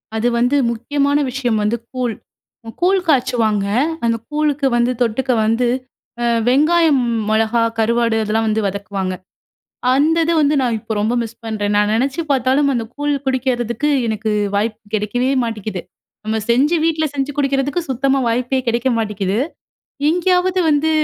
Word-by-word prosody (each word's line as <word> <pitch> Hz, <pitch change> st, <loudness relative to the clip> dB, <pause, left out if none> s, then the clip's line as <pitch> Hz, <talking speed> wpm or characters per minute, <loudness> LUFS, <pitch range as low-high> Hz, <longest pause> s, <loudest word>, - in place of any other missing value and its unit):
அது 220 Hz, +2 st, +1 dB
வந்து, 245 Hz, +4 st, +2 dB, 0.2 s
முக்கியமான 280 Hz, +5 st, 0 dB
விஷயம் 245 Hz, -4 st, -1 dB
வந்து 215 Hz, +3 st, 0 dB, 0.2 s
கூழ். 250 Hz, -3 st, -1 dB, 0.7 s
கூழ் 380 Hz, +2 st, +3 dB
காய்ச்சுவாங்க. 245 Hz, -8 st, +1 dB, 0.4 s
அந்த 230 Hz, 0 st, +1 dB
கூழுக்கு 295 Hz, -2 st, 0 dB
வந்து 240 Hz, +1 st, +2 dB
தொட்டுக்க 250 Hz, +3 st, -1 dB
வந்து 230 Hz, +3 st, +1 dB, 0.6 s
அ -, -, +1 dB, 0.2 s
வெங்காயம், 305 Hz, +2 st, +4 dB, 0.3 s
மொளகா, 220 Hz, +2 st, +2 dB, 0.2 s
கருவாடு 230 Hz, 0 st, +1 dB
அதெல்லாம் 220 Hz, +1 st, 0 dB
வந்து 220 Hz, 0 st, +1 dB
வதக்குவாங்க. 195 Hz, -1 st, -3 dB, 0.8 s
அந்த 300 Hz, +4 st, +3 dB
இது 335 Hz, -, +1 dB
வந்து 295 Hz, 0 st, +3 dB
நான் 240 Hz, -3 st, 0 dB
இப்ப 220 Hz, -, -5 dB
ரொம்ப 220 Hz, +3 st, 0 dB
மிஸ் 230 Hz, +1 st, -8 dB
பண்றேன் 210 Hz, -2 st, -2 dB
நானு. 205 Hz, 0 st, +2 dB
நா -, -, +1 dB
நெனைச்சு 270 Hz, +7 st, 0 dB
பார்த்தாலும் 265 Hz, +2 st, +2 dB
அந்த 235 Hz, -, -1 dB
கூழ் 290 Hz, 0 st, -1 dB
குடிக்கிறதுக்கு 255 Hz, 0 st, -1 dB, 0.2 s
எனக்கு 220 Hz, 0 st, -2 dB, 0.3 s
வாய்ப்பு 215 Hz, +2 st, -1 dB
கிடைக்கவே 230 Hz, +5 st, 0 dB
மாட்டீக்குது! 215 Hz, -5 st, -4 dB, 0.4 s
நம்ம 220 Hz, +1 st, -1 dB
செஞ்சு 280 Hz, +8 st, +3 dB
வீட்ல 315 Hz, -1 st, +1 dB
செஞ்சு 275 Hz, 0 st, -2 dB
குடிக்கிறதுக்கு 280 Hz, +3 st, 0 dB
சுத்தமா 270 Hz, +1 st, +1 dB
வாய்ப்பே 250 Hz, +3 st, 0 dB
கிடைக்க 235 Hz, +2 st, +1 dB
மாட்டீக்குது. 205 Hz, -2 st, -1 dB, 0.7 s
எங்கேயாவது 360 Hz, +2 st, +2 dB
வந்து 300 Hz, +1 st, +2 dB
245 Hz, 145 wpm, -18 LUFS, 220-285 Hz, 0.8 s, வெங்காயம்